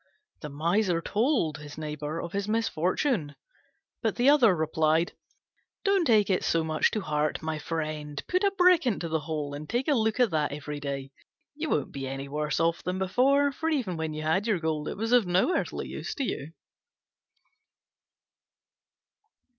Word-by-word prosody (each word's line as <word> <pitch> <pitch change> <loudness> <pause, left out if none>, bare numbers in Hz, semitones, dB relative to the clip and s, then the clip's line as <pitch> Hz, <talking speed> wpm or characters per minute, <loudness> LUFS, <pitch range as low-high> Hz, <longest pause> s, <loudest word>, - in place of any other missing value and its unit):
The 150 - -6
Miser 170 +5 +1
told 210 - 0
him 150 +1 -6
of 160 +3 -4
his 200 0 -2
misfortune; 200 - 0 0.7
but 220 -3 0
the 250 +3 +4
other 245 -10 +6
replied, 160 +1 +1 0.7
"Don't 395 -4 +3
take 215 -6 +4
it 185 - +1
so 165 -1 +1
much 155 -1 +2
to 215 - -2
heart, 150 -2 -1
my 160 -1 -2
friend; 155 -2 -4
put 365 +2 +1
a 400 - +5
brick 360 -6 +4
into 195 -7 -1
the 160 0 0
hole, 150 -2 -4
and 150 +1 -7
take 245 +5 -1
a 300 - +4
look 220 -2 +1
at 240 -8 +3
it 150 -2 +1
every 150 0 -6
day: 140 -1 -5 0.4
you 310 +2 -4
won't 145 - 0
be 135 -1 -5
any 135 +1 -5
worse 150 0 -2
off 165 0 +1
than 180 +1 -3
before, 270 +9 +3
for 320 +4 -2
even 250 - -1
when 160 -1 -3
you 155 - -4
had 175 +8 +1
your 215 -4 +2
gold 160 -2 -2
it - - -4
was 225 +3 -2
of 245 -6 +5
no 185 - +2
earthly - - -2
use - - -5
to 280 - -2
you." 155 - -4
170 Hz, 175 wpm, -28 LUFS, 150-235 Hz, 0.7 s, other